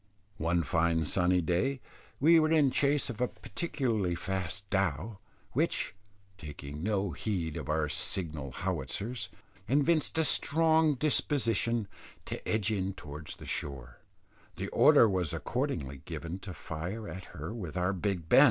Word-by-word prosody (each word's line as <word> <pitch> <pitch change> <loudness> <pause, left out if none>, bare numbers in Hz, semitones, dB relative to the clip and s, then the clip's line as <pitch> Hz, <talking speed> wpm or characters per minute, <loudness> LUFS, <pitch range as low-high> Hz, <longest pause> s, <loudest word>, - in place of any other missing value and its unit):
One 85 +1 +1
fine 80 +1 +1
sunny 90 +3 +2
day, 90 - 0 0.4
we 165 +4 +7
were 155 0 +2
in 150 -5 +4
chase 140 +1 +2
of 120 - -8
a 125 - +3
particularly 120 - -2
fast 95 +2 -3
dhow, 95 +2 0 0.3
which, - - 0 0.5
taking 75 -2 -7
no 100 -1 0
heed 85 -5 -2
of 80 -5 -5
our 75 0 +1
signal 75 -3 -1
howitzers, 100 - -3 0.4
evinced 150 +4 +2
a 160 - +3
strong 160 0 +4
disposition 120 -6 +1 0.4
to - - -5
edge 110 -1 +1
in 95 -2 -1
towards 75 +1 -8
the - - -11
shore, 65 -4 -4 0.6
the - - -4
order 115 - +6
was 90 -6 0
accordingly 80 - -2
given 85 +3 -5
to 95 -1 -8
fire 90 +8 -5
at 95 0 -7
her - - -7
with 90 -7 -6
our 90 +2 +1
Big 95 -3 -2
Ben. - - +7
95 Hz, 145 wpm, -31 LUFS, 80-125 Hz, 0.6 s, we